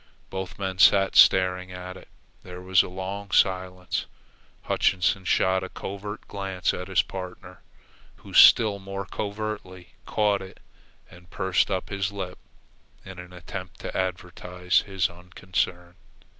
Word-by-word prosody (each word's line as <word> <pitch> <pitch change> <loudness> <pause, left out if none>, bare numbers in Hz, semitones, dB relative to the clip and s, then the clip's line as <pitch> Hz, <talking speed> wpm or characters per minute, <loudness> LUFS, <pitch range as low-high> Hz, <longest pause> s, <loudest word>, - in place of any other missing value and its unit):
Both 95 -1 -5
men 95 -1 -4
sat 95 +1 +5
staring 90 0 +5
at 90 0 -8
it. - - -13 0.3
There 90 0 -10
was 90 -1 +4
a - - -5
long 95 +2 -6
silence. 90 -1 0 0.6
Hutchinson 95 0 +1
shot 95 +1 +2
a 95 - -6
covert 105 +2 -7
glance 95 -2 -2
at 90 - -5
his 95 -2 +2
partner, 90 -1 -9 0.5
who, - - -14
still 105 -3 +7
more 95 0 -6
covertly, 100 -3 -6
caught 105 -2 +1
it, 95 0 -11 0.5
and 85 0 -16
pursed 95 +2 +1
up 95 -2 -2
his 100 0 -2
lips 95 -3 -6 0.6
in 95 -1 -10
an 90 0 -10
attempt 90 +1 -8
to - - -6
advertise 90 0 -1
his 95 0 +1
unconcern. 90 0 -4
95 Hz, 135 wpm, -25 LUFS, 90-95 Hz, 0.6 s, still